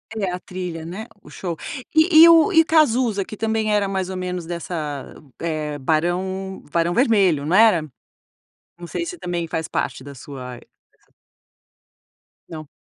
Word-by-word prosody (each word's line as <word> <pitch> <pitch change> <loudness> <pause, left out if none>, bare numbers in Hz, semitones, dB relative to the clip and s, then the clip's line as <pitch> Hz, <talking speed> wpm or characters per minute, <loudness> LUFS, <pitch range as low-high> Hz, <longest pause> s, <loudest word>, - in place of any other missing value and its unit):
É 195 -4 -2
a 180 - -4
trilha, 180 -3 -6
né, 190 +6 -6 0.2
o - - -16
show 175 -3 -5 0.4
e 315 0 +7
e 335 - +9
o 335 +4 +6
e 325 - +7
o - - -1
Cazuza, 245 -10 +2
que 215 - -8
também 220 0 -1
era 205 -1 +1
mais 190 -1 -2
ou 190 - -5
menos 180 -1 -4
dessa, 160 -4 -5 0.3
eh, 155 -3 -3
Barão 185 +6 -2
Barão 170 +1 +1
Vermelho, 195 - +3
não 165 +5 +1
era? 215 -5 +6 1.0
Não 175 - -8
sei 340 - -4
se 345 +1 -7
também 175 - -3
faz 160 0 -4
parte 130 - -3
da 140 +1 -10
sua 130 -2 -9
e - - -19 1.8
Não. 155 -2 -8
180 Hz, 165 wpm, -21 LUFS, 165-220 Hz, 1.8 s, e